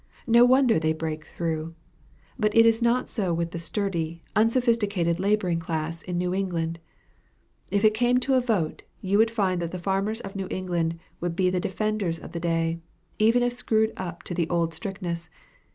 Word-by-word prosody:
No 235 -1 +6
wonder 255 -5 +4
they 160 0 +1
break 155 -1 -4
through. 165 -1 -4 0.6
But 215 +1 +1
it 230 - +8
is 225 0 +4
not 240 +2 +2
so 185 -6 -1
with 170 0 -2
the 170 - -5
sturdy, 170 -2 -2
unsophisticated 215 -6 +2
laboring 195 -3 +1
class 165 0 -3
in 180 -1 -4
New 180 0 0
England. 170 -4 -2 0.9
If 200 +2 +2
it 215 - +6
came 245 +2 +3
to 270 - +1
a 260 - +4
vote, 210 -10 -1 0.2
you 200 +2 +1
would 225 +1 +5
find 195 -6 0
that 170 - -2
the 185 - -5
farmers 195 +4 -1
of 195 0 -8
New 195 -1 -3
England 170 -3 -1 0.2
would 175 -1 -2
be 185 0 +2
the 180 - 0
defenders 195 -2 -1
of - - -10
the 170 - -4
day, 165 -1 0 0.4
even 230 +3 +4
if 245 0 +1
screwed 220 -2 +1
up 175 -2 -6
to - - -5
the 170 -2 -1
old 170 -1 0
strictness. 180 -4 -5
185 Hz, 185 wpm, -26 LUFS, 170-220 Hz, 0.9 s, it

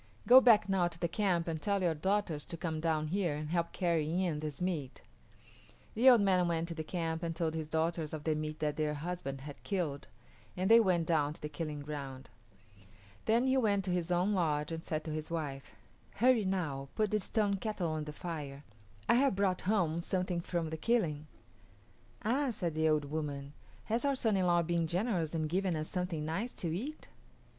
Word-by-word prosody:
Go 255 +2 +9
back 230 -6 +6
now 190 -3 +2
to 170 - -8
the 170 - +1
camp 175 -2 0
and 160 -2 -3
tell 200 +1 0
your 170 -2 +2
daughters 180 -2 0
to 170 - -5
come 160 -2 -3
down 155 -1 0
here 175 -4 0
and 150 +1 -5
help 170 -1 0
carry 170 0 0
in 165 -5 -1
this 150 -2 -5
meat." 165 -8 -3 0.9
The 245 +4 +6
old 240 -4 +7
man 185 -3 +3
went 165 -1 0
to - - -3
the 160 -1 -4
camp 165 -1 -3
and 165 -1 -3
told 160 -1 -1
his 160 -1 -3
daughters 160 0 -1
of 155 -2 -5
the 160 - +1
meat 155 0 -3
that 150 -1 0
their 150 -1 0
husband 150 -4 -4
had 145 0 -9
killed, 170 -8 -2 0.5
and 190 +4 +1
they 230 - +9
went 180 -6 +2
down 150 -3 +1
to - - -15
the 150 - -3
killing 150 -1 -4
ground. 135 -4 -7 0.9
Then 230 +3 +3
he 265 0 +3
went 205 -6 +2
to 185 - -1
his 180 -1 -1
own 180 +4 +2
lodge 150 -5 0
and 165 0 -4
said 155 -1 -2
to 155 - -5
his 155 0 -4
wife, 145 -5 -5 0.4
"Hurry, 240 -2 +4
now, 150 -8 -2
put 215 -2 +1
the 215 - +2
stone 205 0 0
kettle 195 -5 -2
on 155 -1 -2
the 150 - -5
fire. 150 -3 -6 0.4
I - - +5
have 265 -2 +3
brought 190 -2 +1
home 170 -6 +2
something 180 -1 -1
from 170 -2 -2
the 160 - -3
killing." 155 -8 0 1.0
"Ah," 265 +5 +2
said 180 -8 -2
the 160 0 +2
old 150 -1 +2
woman, 145 -1 -4 0.3
"has 230 - -1
our 280 -1 +2
son 225 -5 +1
in 185 -2 +2
law 175 -1 +4
been 170 0 0
generous 175 -3 -1
and 155 -1 0
given 185 +2 0
us 155 0 -4
something 180 -4 -2
nice 195 +10 -2
to 165 -2 -3
eat?" 285 - -6
170 Hz, 205 wpm, -33 LUFS, 155-195 Hz, 1.0 s, Go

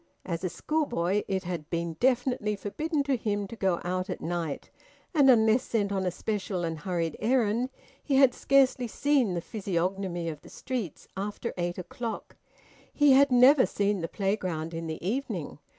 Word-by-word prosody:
As 170 -1 -3
a 185 - 0
schoolboy 210 - 0
it 190 -1 -1
had 170 -3 -5
been 170 -1 -2
definitely 250 -4 +1
forbidden 295 - -2
to 275 -1 +1
him 205 -3 -1
to 215 - -9
go 190 -5 0
out 185 +2 -2
at 180 - -3
night; 165 -3 -4 0.4
and 285 -4 +5
unless 225 -1 +5
sent 205 -5 -1
on 190 -2 0
a - - +3
special 195 -1 -3
and 165 -2 -3
hurried 165 -1 -2
errand, 235 +1 +1 0.3
he 280 - 0
had 265 -2 +6
scarcely 265 -2 +3
seen 260 -5 +1
the 170 - -2
physiognomy 185 -2 -2
of 155 -2 -5
the - - -14
streets 235 - -5
after 205 +4 -4
eight 175 -1 -2
o'clock. 225 +5 -6 0.6
He 290 -1 +4
had 275 +1 +6
never 255 +2 +6
seen 200 -2 0
the 165 - -2
playground 180 -5 -2
in 165 0 -4
the 160 +2 -5
evening. 210 - -3
200 Hz, 170 wpm, -28 LUFS, 175-250 Hz, 0.6 s, had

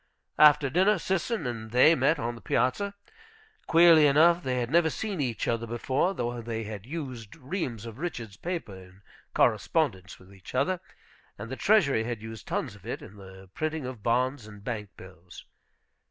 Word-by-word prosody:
After 150 -1 +7
dinner, 190 +6 +3
Sisson 190 - -2
and 115 -3 -5
they 125 +7 +6
met 160 0 +2
on 120 -3 -3
the 115 - -12
piazza. 200 - 0 0.7
Queerly 165 -2 +7
enough, 165 +5 +5
they 130 -5 -2
had 120 +1 -3
never 165 0 +4
seen 200 -2 -3
each 120 -5 -2
other 115 0 -1
before, 130 - 0
though 120 -2 -3
they 115 -1 -4
had 105 0 -8
used 130 -8 -7
reams 130 - -4
of 115 -1 -9
Richards' 120 - -5
paper 170 - -5
in 95 +1 -15 0.3
correspondence 110 - +1
with 95 +1 -18
each 95 +5 -12
other, 180 +7 +1 0.6
and 115 +4 -8
the - - -3
treasury 150 - +3
had 120 -1 -4
used 110 0 -9
tons - - -2
of - - -16
it - - -5
in 100 - -13
the 95 -1 -13
printing 155 -2 -3
of 125 -4 -7
bonds 125 +1 0
and 105 -1 -13
bank 105 -3 -4
bills. 90 -1 -13
125 Hz, 175 wpm, -28 LUFS, 110-160 Hz, 0.7 s, After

